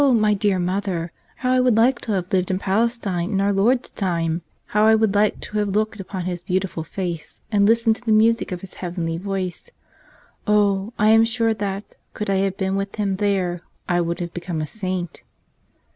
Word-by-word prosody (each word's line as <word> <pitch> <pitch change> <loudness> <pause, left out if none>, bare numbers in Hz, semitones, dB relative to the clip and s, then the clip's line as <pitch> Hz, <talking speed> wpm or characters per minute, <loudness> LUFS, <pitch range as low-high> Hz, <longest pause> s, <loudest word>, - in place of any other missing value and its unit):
my 215 -2 +3
dear 200 -1 +1
mother, 180 -2 -2 0.2
how 255 0 -1
I 255 - +4
would 250 -3 +3
liked 240 +3 +3
to 220 - -1
have 185 -1 -2
lived 185 -1 +2
in 185 - +1
Palestine 195 -3 0
in 200 -3 0
Our 200 +1 +2
Lord's 240 +6 +2
time! 170 -3 -1 0.2
How 210 +1 +3
I 220 - +7
would 220 -2 +2
like 210 +1 +2
to 210 - -3
have 210 - +1
looked 215 0 0
upon 190 -1 -5
His 175 -2 -3
beauti¬ 185 +2 0
ful 165 -3 -6
face 170 -1 -5
and 200 -2 +4
listened 225 0 +3
to - - -17
the 225 - 0
music 225 +1 +3
of 180 -1 -4
His 195 - -11
heavenly 170 -2 -3
voice! 190 - -4 0.8
Oh, 205 0 +2
I 210 +1 +4
am 225 +1 +7
sure 225 0 +1
that, 200 -1 -5 0.2
could 210 -1 -2
I 195 - +2
have 195 0 0
been 190 0 -1
with 195 0 -3
Him 200 -3 -1
there 190 -4 0 0.3
I 175 -1 +2
would 170 0 -2
have 170 -1 -4
become 175 -2 -4
a 155 - -1
saint!" 185 -2 -4
195 Hz, 205 wpm, -22 LUFS, 180-215 Hz, 0.8 s, I